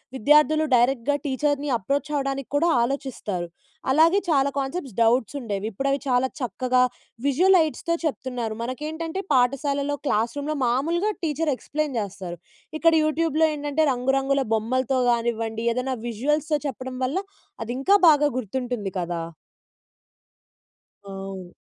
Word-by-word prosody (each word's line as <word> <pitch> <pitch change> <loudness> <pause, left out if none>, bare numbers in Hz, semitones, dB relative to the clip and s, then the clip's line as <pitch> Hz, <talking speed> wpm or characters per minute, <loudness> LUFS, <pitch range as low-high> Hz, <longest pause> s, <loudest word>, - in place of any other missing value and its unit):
విద్యార్థులు 300 +4 +4
డైరెక్ట్‌గా 250 +3 +2
టీచర్‌ని 290 +1 0
అప్రోచ్ 280 +9 -2
అవ్వడానికి 275 -1 -2
కూడా 330 +4 +3
ఆలోచిస్తారు. 235 -8 -3 0.4
అలాగే 325 +7 +5
చాలా 280 -3 +3
కాన్సెప్ట్స్ 275 - -3
డౌట్స్ 230 +3 +2
ఉండేవి. 210 -5 -4
ఇప్పుడు 270 +8 -3
అవి 275 - +1
చాలా 255 0 +2
చక్కగా 250 +1 +1 0.4
విజువల్ 360 +8 +4
లైట్స్‌తో 330 +1 0
చెప్తున్నారు. 250 -6 -3
మనకేంటంటే, 310 +8 -4
పాఠశాలలో 280 +3 +1
క్లాస్ 225 0 +1
రూమ్‌లో 300 +2 -2
మామూలుగా 330 - +1
టీచర్ 305 -1 0
ఎక్స్‌ప్లెయిన్ 295 -1 -3
చేస్తారు. 190 -4 -6 0.4
ఇక్కడ 330 0 +5
యూట్యూబ్‍లో 315 0 +2
ఏంటంటే, 295 +1 0
రంగురంగుల 270 +2 +1
బొమ్మలతో 255 +4 0
గానివ్వండి, 230 -1 -1
ఏదైనా 255 +2 -2
విజువల్స్‌తో 295 +6 0
చెప్పడం 255 0 -6
వల్ల 275 +7 -2 0.5
అది 230 - -5
ఇంకా 385 +9 +4
బాగా 295 -1 +5
గుర్తుంటుంది 245 -3 -3
కదా? 170 -1 -3 1.8
అవును. 195 -2 -8
270 Hz, 120 wpm, -24 LUFS, 235-295 Hz, 1.8 s, అలాగే